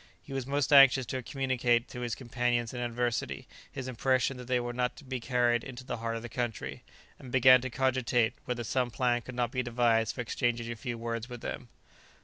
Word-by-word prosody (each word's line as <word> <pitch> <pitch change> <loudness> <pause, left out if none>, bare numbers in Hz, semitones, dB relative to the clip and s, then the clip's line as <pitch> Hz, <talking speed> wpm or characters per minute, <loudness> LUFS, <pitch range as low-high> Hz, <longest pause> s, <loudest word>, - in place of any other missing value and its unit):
He - - -9
was 135 -2 -3
most 140 +1 +1
anxious 135 -2 +8
to 130 +2 -3
communicate 125 -3 0
to 125 - -7
his 120 -3 -2
companions 120 -2 -1
in 125 - -5
adversity 120 -1 -2 0.2
his 130 -2 -6
impression 130 +1 +1
that 125 -1 -9
they 125 -1 +2
were 120 0 -4
not 125 0 -1
to 145 - -13
be 130 -1 -4
carried 120 -1 +1
into 130 -1 -8
the 125 - -4
heart 115 0 -3
of 115 - -5
the - - -5
country, 110 - -4 0.4
and 130 - -10
began 130 -1 +7
to 130 - -4
cogitate 125 -2 +1
whether 125 -2 -3
some 125 +2 0
plan 120 0 +1
could 130 +1 -9
not 120 -1 0
be 130 - 0
devised 120 -2 +1
for 125 - -3
exchanging 120 0 -1
a - - -4
few 120 +1 -5
words 115 +1 -4
with 120 -1 -8
them. - - -6
120 Hz, 215 wpm, -30 LUFS, 120-130 Hz, 0.4 s, anxious